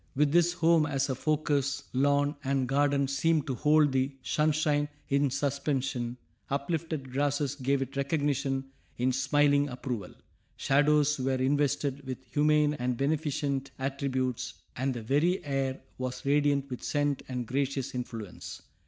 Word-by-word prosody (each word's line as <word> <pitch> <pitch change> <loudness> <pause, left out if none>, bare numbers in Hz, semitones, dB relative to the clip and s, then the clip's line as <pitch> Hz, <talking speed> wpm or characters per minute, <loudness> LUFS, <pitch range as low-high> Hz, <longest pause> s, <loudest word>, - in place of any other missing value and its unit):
With 145 +1 +3
this 175 +1 +4
home 165 -3 +3
as 135 -1 0
a - - +1
focus, 145 0 0
lawn 145 +2 +2
and 135 -1 0
garden 140 +1 +2
seemed 150 +2 +1
to 135 - -2
hold 150 +3 +4
the 130 +1 +1
sunshine 150 -1 +1 0.2
in 140 0 +2
suspension; 135 -3 -1 0.3
uplifted 145 -1 -2
grasses 145 +1 0
gave 140 0 0
it 135 +1 -10
recognition 140 -2 -1 0.3
in 125 +2 +2
smiling 145 +2 +3
approval; 125 -6 -5 0.4
shadows 150 +1 +3
were 130 +1 +1
invested 140 +1 0
with 130 -1 -6
humane 150 +3 +3
and 125 -4 -2
beneficent 140 -1 -1
attributes, 130 -2 -2 0.2
and 130 0 -1
the 115 - -5
very 155 - +1
air 135 -2 -1 0.2
was 130 +2 -4
radiant 140 -1 +2
with 125 - -5
scent 145 -1 0
and 125 -2 -3
gracious 135 +2 -2
influence. 115 -5 -6
140 Hz, 135 wpm, -29 LUFS, 130-145 Hz, 0.4 s, this